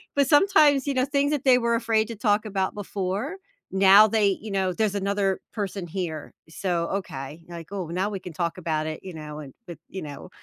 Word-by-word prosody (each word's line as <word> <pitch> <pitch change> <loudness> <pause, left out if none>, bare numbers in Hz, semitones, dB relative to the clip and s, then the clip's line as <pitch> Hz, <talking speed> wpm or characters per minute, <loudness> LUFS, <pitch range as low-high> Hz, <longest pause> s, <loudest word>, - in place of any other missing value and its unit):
but 280 0 +4
sometimes, 295 -4 +5
you 280 - +1
know, 255 -1 +2
things 285 +1 +1
that 290 - -1
they 255 -2 +6
were 235 -1 +1
afraid 225 -1 +1
to 230 - -6
talk 210 0 +1
about 190 -2 -1
before, 205 - -3 0.4
now, 195 +2 +7
they 205 -2 +2
you 215 0 -7
know, 190 -1 0
there's 210 0 0
another 200 -1 0
person 200 -4 -4
here, 165 -3 -5 0.2
so, 170 -1 -1
okay, 160 -5 -5
like, 170 +1 -9
"Oh, 190 -4 -3
now 185 +5 -1
we 200 - -4
can 180 -2 -9
talk 170 +1 -2
about 155 -3 -2
it, 155 0 -5
you 185 -2 -8
know, 150 -1 -8
and 140 -3 -10
with 170 -2 -9
you 190 - -6
know, 145 +2 -8
195 Hz, 215 wpm, -25 LUFS, 170-220 Hz, 0.4 s, now